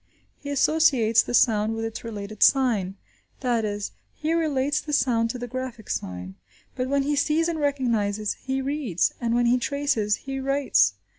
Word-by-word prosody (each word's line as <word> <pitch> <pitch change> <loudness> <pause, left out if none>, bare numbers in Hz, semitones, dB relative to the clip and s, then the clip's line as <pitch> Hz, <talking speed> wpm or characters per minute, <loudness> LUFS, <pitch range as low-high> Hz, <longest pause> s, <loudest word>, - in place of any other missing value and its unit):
He 285 - -8
associates 275 -6 +3
the 245 - -2
sound 220 -2 +3
with 225 0 -3
its 225 - -6
related 215 -2 -7
sign; 220 -9 +3 0.5
that 240 -4 +1
is, 205 -1 -3 0.2
he 310 +2 -1
relates 290 -3 +1
the 300 - -6
sound 230 -5 +2
to 250 - -4
the 245 - -5
graphic 250 -3 -6
sign. 90 0 -5 0.4
But 255 0 -2
when 280 0 +2
he 290 +1 0
sees 305 +3 +1
and 335 -2 -2
recognises, 230 -8 0
he 265 0 -3
reads; 270 - 0
and 235 -1 0
when 240 0 +2
he 245 +1 +3
traces, 245 -6 0
he 270 0 -4
writes. 270 - +2
250 Hz, 170 wpm, -25 LUFS, 220-280 Hz, 0.5 s, associates